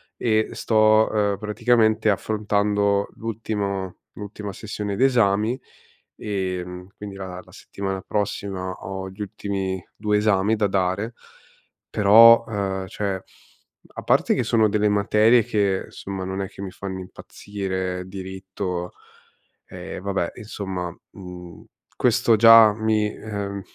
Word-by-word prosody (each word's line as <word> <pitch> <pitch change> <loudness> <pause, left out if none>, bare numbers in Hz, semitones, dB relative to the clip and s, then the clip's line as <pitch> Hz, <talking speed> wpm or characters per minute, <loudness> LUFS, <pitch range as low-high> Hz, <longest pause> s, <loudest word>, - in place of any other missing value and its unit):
E 110 -2 +1
sto, 110 -1 +3
uhm, 105 -2 +1
praticamente 110 0 +2
affrontando 100 -1 0
l'ultimo 100 -4 -4
l'ultima 105 -1 -7
sessione 105 -1 -5
d'esami. 115 -1 +2 0.6
Ehm, 90 -2 -4
quindi 100 -1 -8
la 95 -2 -7
la - - -19
settimana 95 -1 -5
prossima 100 -2 -3
ho 95 +1 -6
gli 95 +3 -11
ultimi 95 -2 -4
2 105 0 0
esami 105 0 +2
da 105 -2 +1
dare. 95 +4 -1 0.8
Però 115 +3 +7
uhm, 95 -3 -3
cioè, 100 -2 -3 0.7
a - - -6
parte - - +3
che - - 0
sono 110 -2 +3
delle 105 0 +2
materie 105 +3 +4
che, 100 -3 0
insomma, 95 -1 -7
non 95 +1 -3
è 95 - -3
che - - -12
mi 100 - -5
fanno 95 0 -6
impazzire. 95 -1 -5
Diritto 95 -1 -5 0.8
ehm, - - -8
vabbè, 100 -3 -2
insomma. 95 -5 -5 0.2
Mhmm, 90 -2 -10 0.3
questo 115 - +3
già 115 -1 +8
mi 110 -1 +1
ehm, 100 -2 -5
100 Hz, 120 wpm, -23 LUFS, 95-110 Hz, 0.8 s, già